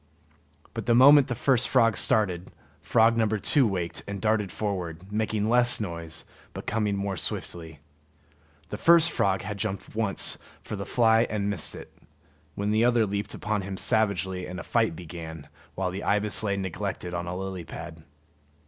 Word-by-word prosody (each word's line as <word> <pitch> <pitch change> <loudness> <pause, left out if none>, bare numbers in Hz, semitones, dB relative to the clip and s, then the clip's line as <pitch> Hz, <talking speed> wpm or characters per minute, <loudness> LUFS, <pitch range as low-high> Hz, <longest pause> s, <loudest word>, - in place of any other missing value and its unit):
But 115 -3 -6
the 120 - +4
moment 140 +2 +7
the 120 - -3
first 125 0 +2
frog 115 -2 +4
started, 95 -5 0 0.3
frog 115 0 +3
number 110 -1 +1
two 130 +5 +3
waked 90 -4 -3
up - - -23
and 100 0 -5
darted 105 -1 0
forward, 95 -3 -4
making 110 0 -1
less 120 +1 +4
noise 85 -6 -6 0.3
but - - -7
coming 105 -2 0
more 100 0 -2
swiftly. 80 -2 -6 0.9
The 105 - -6
first 170 -1 +5
frog 95 -6 0
had 100 +1 -5
jumped 100 -2 -4
once 110 -3 +2 0.2
for - - -5
the 100 -1 -6
fly 115 -1 +3
and 105 -1 -1
missed 90 -7 -3
it, - - -11 0.6
when 100 +1 -1
the 110 +2 +3
other 120 -2 +3
leaped 100 0 -4
upon 105 -1 -2
him 95 0 -6
savagely, 95 -4 0
and 90 0 -6
a - - -6
fight 110 -8 +1
began, 80 -2 -9 0.3
while 95 -1 -2
the 95 +2 -5
ibis 105 0 +2
lay 100 -2 -1
neglected 90 -1 -4
on 85 0 -3
a 90 +1 -4
lily 95 -2 -5
pad. 80 0 -9
100 Hz, 175 wpm, -26 LUFS, 90-110 Hz, 0.9 s, moment